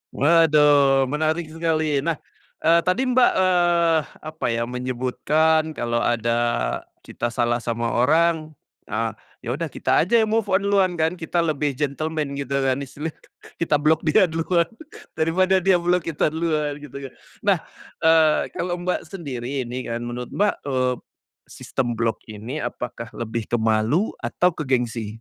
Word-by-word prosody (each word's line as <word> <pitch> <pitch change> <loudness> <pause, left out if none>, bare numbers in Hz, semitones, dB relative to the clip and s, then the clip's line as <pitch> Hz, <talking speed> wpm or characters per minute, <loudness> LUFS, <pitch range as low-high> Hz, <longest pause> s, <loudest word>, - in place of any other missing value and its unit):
Waduh 145 -3 +5
menarik 155 +1 -1
sekali. 160 -3 0
Nah, 165 +3 -1 0.5
eee 165 +1 +5
tadi 215 +9 +2
Mbak, 255 -1 +4
eee, 175 -3 +3 0.2
apa 155 +1 -5
ya 115 0 0
menyebutkan 130 +6 0
kalau 120 -1 -1
ada 115 -1 0 0.7
kita 120 - -4
salah 120 0 0
sama 115 0 -2
orang, 155 +3 +2 0.3
ah 110 0 -1 0.3
ya 120 - -3
udah 165 +5 -2
kita - - +1
aja 210 +7 +1
yang 215 - -2
move 225 -2 +1
on 190 +1 +2
duluan 195 -3 +2
kan 165 +2 0
kita 170 +1 0
lebih 150 -3 -1
gentleman 145 0 -2
gitu 140 0 -3
kan, 135 -1 +1
istilahnya 140 +4 -6 0.4
kita 165 -3 +2
block 155 +1 +3
dia 155 - +5
duluan, 165 +1 +1 0.5
daripada 185 +4 +2
dia 190 +1 +3
block 175 0 +1
kita 155 -1 0
duluan 155 -3 -1
gitu 145 -2 -10
kan. - - -25 0.3
Nah, 200 -3 +3 0.4
eee, 160 -2 +4
kalau 175 0 -2
Mbak 180 +1 -2
sendiri 135 -7 -4
ini 125 -1 -5
kan, 115 - -2
menurut 120 0 -6
Mbak, 205 +1 +1 0.2
eee, 130 -1 +1 0.5
sistem 120 -3 -3
block 115 -1 0
ini 115 +8 -6
apakah 120 -1 -5
lebih 115 0 -3
ke 120 - 0
malu 110 - +1
atau 180 -1 +1
ke 155 - -3
gengsi? 120 -4 0
155 Hz, 150 wpm, -23 LUFS, 125-170 Hz, 0.7 s, Waduh